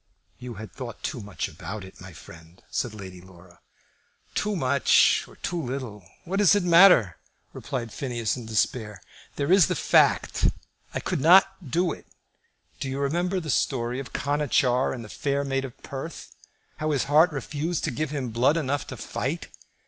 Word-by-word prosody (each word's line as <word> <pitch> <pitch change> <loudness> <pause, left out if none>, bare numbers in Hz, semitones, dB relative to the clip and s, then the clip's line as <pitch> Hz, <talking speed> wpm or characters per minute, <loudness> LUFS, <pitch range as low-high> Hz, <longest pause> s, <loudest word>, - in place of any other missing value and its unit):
"You 125 -2 -7
had 110 +1 -9
thought 120 -4 -8
too 125 - -3
much 100 -5 -4
about 105 0 -7
it, 95 -1 -13
my 90 +1 -10
friend," 80 +1 -15
said 115 -3 -2
Lady 95 -3 -9
Laura. 90 -1 -17 0.7
"Too 210 0 -1
much 140 -4 +3
or - - -16
too 175 -1 -3
little, 125 - -5 0.2
what 185 +3 -2
does 205 -1 +6
it 205 - +1
matter?" 170 - +6 0.4
replied 120 -6 -5
Phineas, 120 -5 -2
in 120 -4 -8
despair. 110 -1 -1 0.4
"There 140 +4 -1
is 185 -4 +6
the - - -1
fact. - - +3 0.5
I - - 0
could - - -2
not 185 0 +5
do 175 +4 +1
it. - - -9 0.7
Do 135 - -3
you 135 - -3
remember 175 +7 0
the 160 -4 -3
story 125 0 0
of 135 - -7
Conachar 140 -3 +1
in 120 -3 -6
the - - -9
'Fair 140 +5 -2
Maid 135 -1 -1
of 130 -1 -10
Perth;' 140 +4 -7 0.5
how 155 - -2
his 145 -4 +1
heart 155 +5 +4
refused 150 +4 -3
to - - 0
give 155 -1 -2
him 140 -4 -3
blood 125 +8 +2
enough 145 -2 -2
to - - -7
fight? - - -4
135 Hz, 175 wpm, -26 LUFS, 115-155 Hz, 0.7 s, does